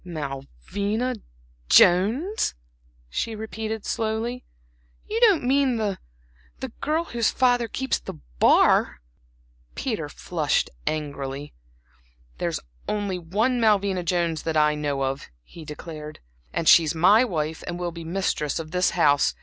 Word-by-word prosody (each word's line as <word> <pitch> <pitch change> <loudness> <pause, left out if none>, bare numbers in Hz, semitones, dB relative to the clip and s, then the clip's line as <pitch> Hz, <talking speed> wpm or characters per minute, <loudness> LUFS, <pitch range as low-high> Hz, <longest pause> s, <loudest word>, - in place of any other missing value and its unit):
"Malvina 175 - -3 0.6
Jones!" 230 - +4 0.5
she 220 - -3
repeated, 220 0 -5
slowly. 225 +3 -2 0.6
"You 440 +2 -1
don't 415 - +5
mean 265 0 +2
the 210 -4 -2 0.6
the 265 - -4
girl 310 +3 +1
whose 235 -8 0
father 245 -2 +2
keeps 265 +3 -1
the - - -8 0.2
bar?" - - +4 0.8
Peter - - -3
flushed - - -1 0.2
angrily. 145 -2 -4 0.9
"There's - - -1 0.3
only 205 -3 -2
one 220 +9 0
Malvina 200 -4 +2
Jones 170 -2 0
that 160 -1 -1
I 150 0 +4
know 145 -2 -2
of" 135 +1 -3
he 165 - -12
declared, 150 0 -8 0.3
"and 160 - -2
she's 165 -1 +6
my 195 +8 +6
wife 160 -8 -3
and 175 - -3
will 175 -1 -2
be 170 0 -8
the 160 - -8
mistress 170 -6 -1
of 160 -2 -6
this 180 0 +2
house. 145 -4 +3
185 Hz, 130 wpm, -24 LUFS, 155-230 Hz, 0.9 s, she's